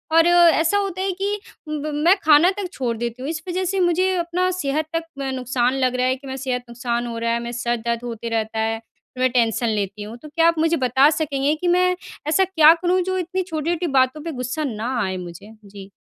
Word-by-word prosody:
और 330 +1 +6
ऐसा 345 +1 +4
होता 385 -2 -2
है 385 - 0
कि 410 +1 -1 0.3
ब 305 0 -3
मैं 340 +6 +4
खाना 310 +3 +6
तक 400 -3 -3
छोड़ 240 -3 -2
देती 235 +2 -4
हूँ। 275 - -4
इस 315 -1 -4
वजह 365 +1 -1
से 385 +1 -1
मुझे 365 +2 +2
अपना 345 +2 0
सेहत 310 -3 -1
तक 330 - 0 0.2
म 270 -1 -2
नुकसान 250 0 0
लग 255 -2 0
रहा 250 0 +1
है 260 - +1
कि 275 +1 -13
मैं 265 0 -5
सेहत 250 -2 -3
नुकसान 240 0 -3
हो 230 -1 -5
रहा 230 0 -1
है, 235 - 0
मैं 235 - -5
सर 240 0 -1
दर्द 235 +1 -3
होते 230 -1 -5
रहता 220 -1 -2
है, 225 0 -1
फिर 250 +2 -14
मैं 255 - +4
टेंशन 235 -1 +1
लेती 205 -1 -3
हूँ। 220 +3 -8
तो 305 - -10
क्या 330 +2 +3
आप 335 -1 +2
मुझे 330 +1 +2
बता 265 +3 +4
सकेंगे 295 -2 0
कि 350 +3 -3
मैं 365 +1 +3 0.3
ऐसा 320 +5 +3
क्या 325 -4 +6
करूँ, 360 +2 +1
जो 375 +1 -2
इतनी 370 +1 -2
छोटी-छोटी 340 0 -2
बातों 260 +2 +2
पे 335 - -4
गुस्सा 250 +3 -3
ना 245 -1 -3
आए 190 -1 -2
मुझे? 180 +4 -9
जी। 195 -1 -11
275 Hz, 235 wpm, -21 LUFS, 235-340 Hz, 0.3 s, और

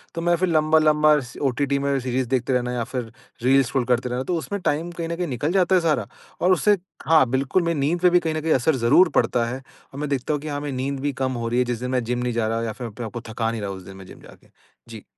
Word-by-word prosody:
तो 165 - -3
मैं 175 +1 +2
फिर 185 +2 0
लंबा-लंबा 155 -1 +4
स 125 -2 -10
ओटीटी 140 +1 0
में 140 0 0
सीरीज़ 130 0 -2
देखते 130 0 0
रहना 125 -1 0
या 120 -1 -1
फिर 125 -2 -5 0.3
रील्स 135 0 +4
स्क्रॉल 125 0 -1
करते 125 0 0
रहना 125 +1 -2
तो 180 - -2
उसमें 200 +5 -4
टाइम 165 +1 -1
कहीं 170 -1 -5
न 170 - -2
कहीं 175 0 -2
निकल 140 +4 -2
जाता 190 -1 +3
है 180 - +4
सारा 160 -2 0 0.3
और 180 - +3
उससे 205 +3 +3 0.3
हाँ, 160 -3 +5
बिल्कुल 135 +7 +1
मेरी 170 -3 -1
नींद 155 +6 +1
पे 180 - +6
भी 180 0 +4
कहीं 160 -2 -2
न 155 - -2
कहीं 160 +1 +2
असर 135 +4 +2
ज़रूर 130 +9 +4
पड़ता 120 -1 +2
है, 120 +2 -4 0.4
और 135 - -7
मैं 150 -1 -3
देखता 140 +1 -1
हूँ 145 - -2
कि 155 - -7
हाँ, 145 -1 -3
मेरी 145 -2 -4
नींद 135 +1 -2
भी 145 +1 -2
कम 130 - 0
हो - - -2
रही 120 +2 +1
है 125 - +2
जिस 120 -2 -3
दिन 125 +1 -4
मैं 125 -1 0
जिम 120 +1 -2
नहीं 125 -1 -1
जा 115 -1 0
रहा 115 +1 -1
या 115 - -2
फिर 125 0 -6
अपने 115 +2 -7
आप 110 - -7
को 120 - -5
थका 115 0 -1
नहीं 115 -1 -5
रहा 100 - -3
उस 95 -1 -7
दिन 95 +1 -11
मैं 95 - -11
जिम - - -13
जाके। - - -17 0.4
जी। 110 -2 -9
135 Hz, 295 wpm, -23 LUFS, 120-155 Hz, 0.4 s, पे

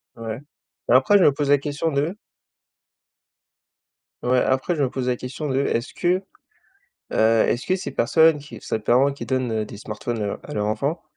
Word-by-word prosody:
Ouais, 115 -1 -5 0.5
mais 120 - +6
après 135 +11 +5
je 195 - +4
me - - +6
pose 145 0 -2
la 145 - +6
question 150 +3 -2
de 150 +7 -1 2.1
Ouais, 125 +1 +3
après 130 +6 0
je 150 - -2
me 135 - +2
pose 125 0 -4
la 125 - +1
question 130 +5 -6
de 135 -1 0
est-ce 135 -1 -1
que, 180 +2 0 0.9
heu, - - -1 0.3
est-ce 120 - -1
que 185 - +2
ces 190 - -5
personnes 160 +5 +4
qui 145 0 -11
ces 110 - -2
parents 130 +6 +3
qui 140 - -8
donnent, 130 -3 -1
heu, 110 -1 -1
des 105 - -10
smartphones, 110 +2 -5
heu, 100 - -3
à - - -9
leur 105 -1 0
enfant, 140 +11 -2
130 Hz, 195 wpm, -23 LUFS, 120-150 Hz, 2.1 s, mais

